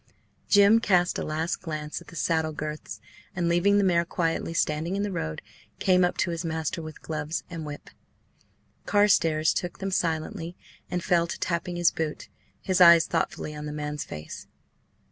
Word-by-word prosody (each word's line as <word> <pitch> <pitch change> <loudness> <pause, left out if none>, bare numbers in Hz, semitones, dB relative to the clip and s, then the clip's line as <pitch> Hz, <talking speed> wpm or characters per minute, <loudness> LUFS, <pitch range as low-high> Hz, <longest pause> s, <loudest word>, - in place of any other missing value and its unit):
Jim 205 +2 +6
cast 180 -5 +2
a - - -2
last 160 +3 -2
glance 155 -3 -5
at - - -16
the 170 - -12
saddle 160 -1 0
girths, 150 0 -6 0.4
and, 175 -2 0
leaving 175 +4 +3
the 205 - +3
mare 175 -3 +3
quietly 165 -1 -2
standing 160 +2 0
in 200 - -1
the 205 - -2
road, 80 - -4 0.3
came 185 -1 +3
up 175 - +1
to 175 - 0
his 170 +1 -3
master 160 0 -2
with 155 -1 -10
gloves 155 0 -3
and 160 -2 -6
whip. 145 0 -9 1.0
Carstares 165 -7 +3
took 175 -1 -3
them 195 0 -4
silently 165 +1 -2 0.3
and 180 -1 -2
fell 170 -1 +2
to - - -6
tapping 175 0 -2
his 175 -1 +3
boot, 155 -2 -4 0.3
his 185 -1 +1
eyes 170 -1 +8
thoughtfully 160 -2 -2
on 150 0 -6
the - - -4
man's 150 0 -4
face. 75 +1 -9
170 Hz, 175 wpm, -26 LUFS, 155-180 Hz, 1.0 s, eyes